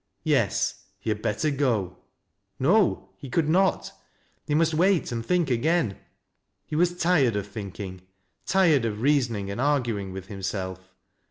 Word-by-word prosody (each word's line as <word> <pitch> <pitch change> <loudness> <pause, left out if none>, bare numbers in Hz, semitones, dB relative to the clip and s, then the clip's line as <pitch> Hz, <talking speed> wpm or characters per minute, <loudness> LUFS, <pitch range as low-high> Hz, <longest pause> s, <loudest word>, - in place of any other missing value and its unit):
Yes; - - 0
he 110 - -3
had 105 0 -3
better 150 +9 0
go. 115 -10 0 0.6
No, 180 +9 +2
— - - -40
he 135 - -8
could 155 +4 +1
not, 185 +4 +2 0.3
— - - -40
he 150 - +1
must 165 +1 +3
wait 180 0 +2
and 115 -1 -3
think 175 -1 +1
again. 125 - +1 0.7
He - - -5
was 175 +2 +2
tired 160 - +3
of 100 -1 -2
thinking, 100 -2 -7 0.2
— - - -47
tired 170 -9 +4
of 110 -2 -2
reason 135 -5 +2
ing 100 -1 -4
and 100 - -3
arguing 120 -9 0
with 95 -1 -7
himself. 95 -2 -5
125 Hz, 165 wpm, -26 LUFS, 100-160 Hz, 0.7 s, tired